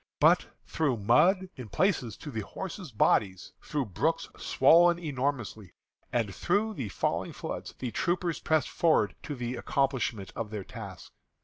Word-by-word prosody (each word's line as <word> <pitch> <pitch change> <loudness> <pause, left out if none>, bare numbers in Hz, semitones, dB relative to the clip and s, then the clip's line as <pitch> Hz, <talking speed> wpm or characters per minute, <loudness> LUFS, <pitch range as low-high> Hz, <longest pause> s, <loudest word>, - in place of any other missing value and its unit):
But - - +5 0.2
through 145 -6 0
mud, 170 - +4
in 125 -4 -8
places 135 - 0
to 150 - -8
the 110 - -3
horses' 180 - -7
bodies; 95 -3 +1
through 145 -3 -2
brooks 160 - -1
swollen 175 +1 +5
enormously, 135 - -3 0.4
and 115 -5 0
through 205 - 0
the 130 - -4
falling 90 - -1
floods, - - -6
the 125 -2 -4
troopers 175 - -1
pressed 155 -1 +1
forward 170 -3 +2
to 145 - -5
the 125 0 -3
accomplishment 125 -7 -1
of 115 -2 -4
their 105 -2 -5
task. - - -9
135 Hz, 145 wpm, -29 LUFS, 110-170 Hz, 0.4 s, But